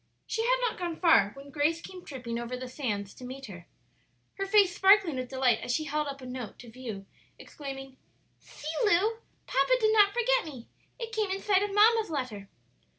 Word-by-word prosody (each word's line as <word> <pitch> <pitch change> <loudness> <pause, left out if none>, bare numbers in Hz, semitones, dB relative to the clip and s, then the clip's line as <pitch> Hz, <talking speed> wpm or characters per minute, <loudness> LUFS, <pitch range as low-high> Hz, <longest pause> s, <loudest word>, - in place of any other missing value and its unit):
She 450 - -2
had - - +3
not 480 -6 -1
gone 345 -2 -3
far 320 - +5
when 280 +1 -12
Grace 310 +3 +1
came 365 +1 -10
tripping 240 -4 -5
over 240 +1 -4
the 255 0 -6
sands 210 -7 -4
to - - -13
meet 265 +2 -7
her, 175 -6 -11 0.7
her 390 - -1
face 390 -3 +5
sparkling 385 -6 +5
with 255 -1 -4
delight 260 -4 +2
as - - -3
she 310 - 0
held 300 0 -2
up 275 -1 -6
a - - -9
note 250 -3 -7
to 240 -2 -12
view, 225 -5 -7 0.3
exclaiming, 270 -2 -9 0.4
"See, - - -15 0.2
Lu! 420 +2 +3 0.3
papa - - +2
did 435 -2 +3
not 410 -2 +6
forget 485 +1 +2
me; 265 -7 -9 0.3
it 460 -1 -6
came 430 -3 0
inside 390 0 +2
of 410 0 -1
mamma's 435 +1 +4
letter." 245 -10 -4
295 Hz, 195 wpm, -29 LUFS, 255-405 Hz, 0.7 s, not